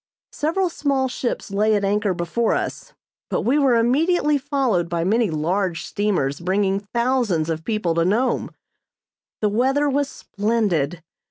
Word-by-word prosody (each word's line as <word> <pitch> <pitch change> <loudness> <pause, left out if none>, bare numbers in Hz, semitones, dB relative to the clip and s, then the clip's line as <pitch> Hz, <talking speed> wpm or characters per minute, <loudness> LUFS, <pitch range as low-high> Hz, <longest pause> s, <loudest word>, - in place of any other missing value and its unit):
Several 335 +5 0
small 280 -4 0
ships 250 -4 -4
lay 210 +2 +2
at 200 -1 0
anchor 205 -1 +1
before 175 +7 0
us, - - -4 0.4
but - - 0
we 270 +6 +2
were 270 -4 +4
immediately 295 +7 +2
followed 260 - 0
by 170 -1 -1
many 220 +4 +2
large 170 +3 -1
steamers 180 -10 -1
bringing 190 +2 +1
thousands 215 -6 0
of 160 0 -4
people 215 -6 -1
to 165 0 +2
Nome. 220 +9 +1 0.9
The 210 - +2
weather 265 +7 +2
was 285 0 0
splendid. 195 -7 -1
210 Hz, 145 wpm, -22 LUFS, 180-260 Hz, 0.9 s, were